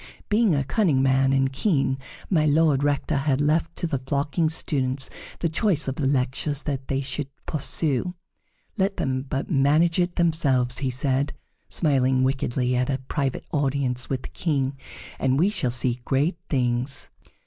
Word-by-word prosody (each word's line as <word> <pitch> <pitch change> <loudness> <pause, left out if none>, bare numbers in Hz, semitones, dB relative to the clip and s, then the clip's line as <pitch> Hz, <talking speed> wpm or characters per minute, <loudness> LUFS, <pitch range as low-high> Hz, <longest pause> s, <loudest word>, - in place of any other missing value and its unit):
Being 210 -5 +3
a 140 - +1
cunning 145 - +2
man 135 0 +3
and 135 0 +1
keen, 135 -6 +1 0.3
My 155 -5 +2
Lord 150 -2 +3
Rector 145 +1 0
had 135 -1 +1
left 160 +3 +1
to - - -3
the 140 -5 -1
flocking 145 +4 0
students 135 -4 0 0.3
the 170 - +2
choice 160 -2 0
of 135 - 0
the 140 - 0
lectures 135 +2 0
that 135 -3 -3
they 135 0 -1
should 140 +1 -4 0.2
pursue. 155 +2 -1 0.6
"Let 195 +1 +1
them 130 -1 -1
but 135 0 -4
manage 155 +4 +3
it 175 0 0
themselves," 140 -7 +2
he 135 - -1
said, 135 +2 0 0.4
smiling 130 -4 +2
wickedly, 130 -1 0
at 125 +1 0
a 135 - +1
private 140 -4 -2
audience 135 -4 -1
with 130 -2 -2
the - - -7
King, 140 -5 -1 0.4
"and 130 0 +2
we 180 +7 +4
shall 190 -12 -1
see 120 0 +1
great 145 +7 0
things." 125 0 -1
140 Hz, 160 wpm, -24 LUFS, 130-155 Hz, 0.6 s, we